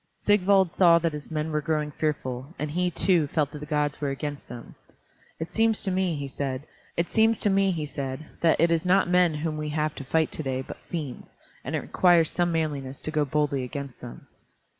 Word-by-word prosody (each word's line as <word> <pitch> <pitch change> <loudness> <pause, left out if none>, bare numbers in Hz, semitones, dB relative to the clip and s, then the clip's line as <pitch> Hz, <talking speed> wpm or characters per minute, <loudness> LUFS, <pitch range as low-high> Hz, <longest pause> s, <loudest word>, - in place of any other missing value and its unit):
Sigvald 195 -3 +3
saw 170 -3 +6
that 165 -1 0
his 150 -1 -7
men 155 0 -2
were 150 0 0
growing 150 -1 -1
fearful, 140 -1 -3
and 150 0 -3
he, 180 +3 +1
too; 175 -2 +3
felt 145 -1 0
that 150 - -8
the 150 - -8
gods 150 -1 -1
were 145 - 0
against 145 +1 -5
them. 120 0 -9 0.7
"It 160 - -5
seems 225 -1 +2
to 190 - +5
me," 185 -2 0
he 140 -1 -4
said, 135 -1 -4 0.3
"that 170 - +1
it 170 +1 +4
is 165 -1 +2
not 185 0 +3
men 180 -2 +3
whom 155 0 -3
we 150 0 -3
have 150 0 -1
to - - -8
fight 160 +4 +1
to - - -5
day 130 -2 -2
but - - -9
fiends, 150 -7 -6 0.3
and - - -3
it - - -1
requires 175 -3 +3
some 175 -1 +1
manliness 145 -5 -2
to 155 - -2
go 150 -2 +1
boldly 145 -1 0
against 140 0 -7
them." 60 - -10
155 Hz, 195 wpm, -26 LUFS, 145-175 Hz, 0.7 s, saw